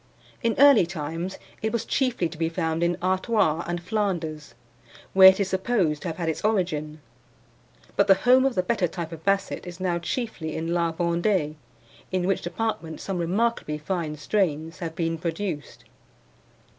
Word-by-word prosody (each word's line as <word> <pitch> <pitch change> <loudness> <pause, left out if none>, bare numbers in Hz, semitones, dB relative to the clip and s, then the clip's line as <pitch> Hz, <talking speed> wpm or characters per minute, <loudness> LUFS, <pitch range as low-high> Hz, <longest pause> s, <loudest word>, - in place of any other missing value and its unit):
In 230 -3 +1
early 280 -10 +7
times 165 +2 -4 0.2
it 220 - -1
was 230 0 -2
chiefly 250 -10 0
to 160 - -10
be 165 -1 +1
found 160 0 -1
in 170 0 +1
Artois 185 -3 +1
and 175 0 -2
Flanders, 170 - -3 0.6
where 190 0 +10
it 190 - +1
is 195 -2 0
supposed 190 -6 0
to - - -5
have 160 - -4
had 170 -2 -3
its 160 - -2
origin; 160 -8 -1 0.9
but 200 - +3
the 195 - +7
home 250 +6 +4
of 270 -2 +1
the 185 - +1
better 190 -2 +1
type 170 0 -6
of 165 -1 -9
Basset 195 -2 0
is 175 0 -8
now 180 -2 0
chiefly 175 -3 -4
in 165 +1 -2
La 170 -1 +1
Vendee, 170 -1 0 0.6
in 185 -1 0
which 195 0 +1
department 175 -3 -3
some 190 -2 -3
remarkably 185 -2 0
fine 155 -1 -3
strains 160 -2 -1
have 165 -2 -5
been 165 -1 -1
produced. 170 -1 -4
175 Hz, 170 wpm, -25 LUFS, 160-195 Hz, 0.9 s, where